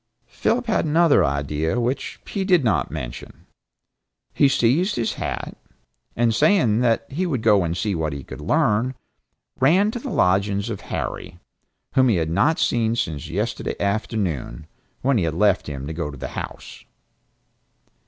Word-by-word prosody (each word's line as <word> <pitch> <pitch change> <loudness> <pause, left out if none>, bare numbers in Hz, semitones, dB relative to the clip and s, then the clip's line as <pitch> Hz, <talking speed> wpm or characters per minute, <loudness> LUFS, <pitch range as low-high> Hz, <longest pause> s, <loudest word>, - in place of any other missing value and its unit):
Philip 245 +2 -1
had 225 - +1
another 160 0 +4
idea 75 - -1
which, 125 +3 -2
he 200 - -2
did 180 -6 +3
not 110 -9 +1
mention. 65 -4 -8 0.9
He 140 - +4
seized 135 - +2
his 115 -2 -1
hat, - - -5 0.6
and 115 -1 +2
saying 120 - +3
that 115 -2 +2
he 180 +7 -1
would 130 -9 -2
go 105 -4 +4
and 85 +1 -2
see 105 +2 -1
what 80 -3 -1
he 70 -1 -6
could - - -9
learn, 125 - +1 0.6
ran 185 +11 +4
to 240 - -5
the 270 - -6
lodgings 100 - +1
of 105 - -5
Harry; 85 - -5 0.5
whom 130 -1 +4
he 110 - +3
had 80 -2 -1
not 150 - +2
seen 115 -1 +1
since 80 -10 -3
yesterday - - -2
afternoon, 100 - -2 0.4
when 130 -3 +3
he 85 -3 +1
left 95 +4 +2
him 70 -2 -5
to 80 - -5
go 80 -2 -3
to 70 - -9
the - - -5
House. - - -8
110 Hz, 160 wpm, -22 LUFS, 80-135 Hz, 0.9 s, another